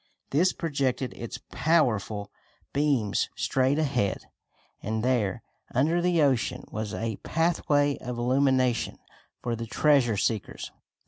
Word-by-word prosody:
This 170 +7 +4
projected 140 -5 -1
its 115 - -6
powerful 110 - +1 0.4
beams 140 -8 +1
straight 135 +2 +1
ahead 140 -11 0 0.6
and 110 +1 -2
there, 120 -7 0 0.3
under 160 +7 +3
the 175 -3 +3
ocean, 130 -5 +1
was 110 -2 -3
a 110 -2 -3
pathway 150 -3 +1
of 125 -1 -5
illumination 130 -1 +2 0.5
for 120 -1 -1
the 115 0 -5
treasure 130 -4 +3
seekers. 105 +1 -2
130 Hz, 115 wpm, -27 LUFS, 115-145 Hz, 0.6 s, This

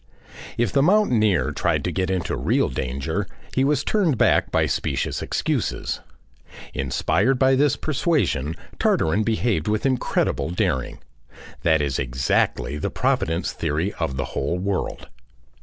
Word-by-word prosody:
If 115 -4 +1
the 135 - +3
mountaineer 125 - +3
tried - - 0
to - - -1
get 95 -1 -1
into 95 -2 -1
real - - +1
danger 65 +1 -3 0.3
he 130 - +2
was 140 0 +2
turned 180 - +1
back - - +3
by - - +3
specious 70 - -1
excuses. - - -2 0.7
Inspired 95 - +1
by 130 +1 +4
this 140 +1 +3
persuasion 140 - 0 0.2
Tartarin 80 +7 +2
behaved 110 -6 0
with 110 +3 0
incredible 130 -9 0
daring.... 65 -7 -1 0.6
That 80 -3 +3
is 70 -2 -1
exactly 65 +3 0
the - - -1
Providence 80 +3 0
theory 80 +5 -1
of 80 -6 -2
the 70 - -1
whole 75 +6 -1
world. 95 +1 -3
95 Hz, 135 wpm, -23 LUFS, -, 0.7 s, by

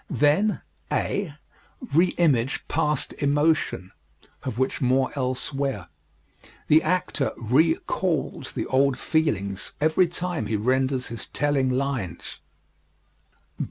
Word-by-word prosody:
Then 175 +9 +2 0.3
(a) 185 -8 -1 0.6
Re 170 +5 +5
image 135 -7 +1
past 150 -2 0
emotion 145 - +1 0.5
of 110 - -5
which 130 +3 -1
more 130 0 +2
elsewhere. 130 -6 -2 0.8
The 155 +1 +6
actor 180 -6 0
re 150 +9 +3
calls 160 -7 -2
the - - -2
old 135 0 +2
feelings 100 - -1
every 160 +4 +3
time 175 0 -3
he 110 - -1
renders 130 +4 0
his 115 -1 -6
telling 140 -3 +1
lines. 130 -8 -3
140 Hz, 105 wpm, -25 LUFS, 130-155 Hz, 0.8 s, The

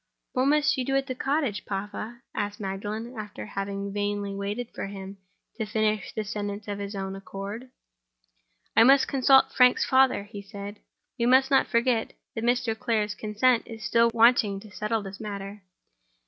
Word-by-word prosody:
"What 255 0 +2
must 300 0 +3
you - - +1
do 270 +2 -1
at 270 0 +2
the 260 - -3
cottage, 270 -5 -1
papa?" 210 +4 -5
asked 205 0 -3
Magdalen, 210 +5 -4
after 210 - -7
having 195 - -4
vainly 205 -1 -2
waited 205 +4 -4
for - - -4
him 195 0 -8 0.4
to 220 - 0
finish 215 -2 0
the 215 - -3
sentence 205 0 -5
of 205 -1 -4
his 200 +1 -5
own 195 0 -4
accord. 200 +5 -7 1.1
"I 225 - +7
must 270 +2 +6
consult 270 0 +5
Frank's 250 -1 +5
father," 260 -5 +4
he 205 0 -9
replied. 200 0 -8 0.4
"We 235 - +2
must 260 +2 +5
not 270 - +4
forget 235 -1 +1 0.2
that 225 - -4
Mr. 245 -1 +1
Clare's 215 -2 0
consent 225 +4 +1
is 225 -2 -9
still 230 +2 +4
wanting 225 -3 +4
to 215 -1 -13
settle 215 +1 -2
this 195 0 -8
matter. 200 -1 -6
215 Hz, 170 wpm, -27 LUFS, 200-245 Hz, 1.1 s, I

